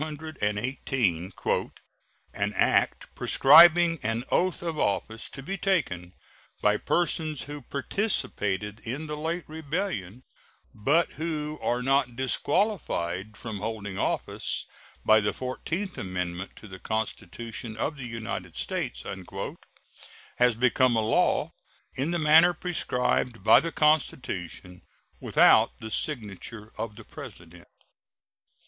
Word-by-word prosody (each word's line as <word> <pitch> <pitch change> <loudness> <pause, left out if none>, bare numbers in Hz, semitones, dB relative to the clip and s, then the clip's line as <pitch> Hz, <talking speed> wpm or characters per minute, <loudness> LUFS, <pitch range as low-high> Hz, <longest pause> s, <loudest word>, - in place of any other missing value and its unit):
218, 125 - -2 1.0
"An 105 0 -1
act - - +1
prescribing 165 +3 +7
an 115 +2 -1
oath 185 -1 +1
of 165 -3 -3
office 110 +3 -1
to 135 - -8
be 195 +7 -4
taken 95 - -1 0.4
by - - +3
persons 160 -4 0
who 145 0 -7
participated 105 - -2
in 130 +9 -5
the 150 0 -4
late 165 +3 -3
rebellion, 155 - -4 0.5
but 145 +11 +2
who 155 -1 -3
are 125 +1 0
not 135 -2 +2
disqualified 120 - -1
from 110 -4 -6
holding 105 -2 -4
office - - -2 0.4
by 110 0 +7
the 105 - 0
fourteenth 170 +9 -4
amendment 90 0 -4
to 110 - -12
the 95 -1 -10
Constitution 110 +1 -4
of 150 +7 -1
the 135 -4 -7
United 115 -1 -5
States," - - -3 1.3
has 125 -2 +4
become 125 +1 +3
a 110 - +3
law 110 +1 +2 0.4
in 135 +5 -2
the 175 - 0
manner 165 +3 +6
prescribed 125 - -1
by 110 - +8
the 165 - -3
Constitution, 125 - 0 0.4
without - - +4
the 110 -1 -7
signature 110 - -3
of 115 -2 -5
the 115 - -11
President. 85 0 -11
125 Hz, 115 wpm, -27 LUFS, 105-155 Hz, 1.3 s, by